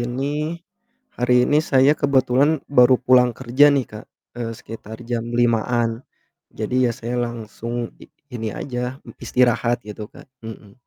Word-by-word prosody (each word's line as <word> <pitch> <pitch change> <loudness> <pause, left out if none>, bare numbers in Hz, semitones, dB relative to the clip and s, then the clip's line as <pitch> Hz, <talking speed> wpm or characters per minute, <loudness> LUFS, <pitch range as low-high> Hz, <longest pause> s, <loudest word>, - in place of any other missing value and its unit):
ini 145 +6 -3 0.6
hari 125 0 +3
ini 150 +3 +3
saya 135 -2 +4
kebetulan 140 +1 +2
baru 130 -2 +5
pulang 125 -1 +3
kerja 130 +3 +4
nih 140 -3 +2
Kak, 105 0 -10 0.3
eee, 115 -1 -3
sekitar 110 0 -10
jam 115 -1 -3
5-an 115 0 +1 0.5
jadi 125 +3 0
ya - - -2
saya 120 0 -4
langsung 120 0 -5
i - - -13 0.3
ini 115 -2 -4
aja 125 -1 -4 0.2
istirahat 120 -1 +1
gitu 105 0 -8
Kak, - - -16 0.2
hmm 110 -2 -10
125 Hz, 140 wpm, -21 LUFS, 115-130 Hz, 0.6 s, baru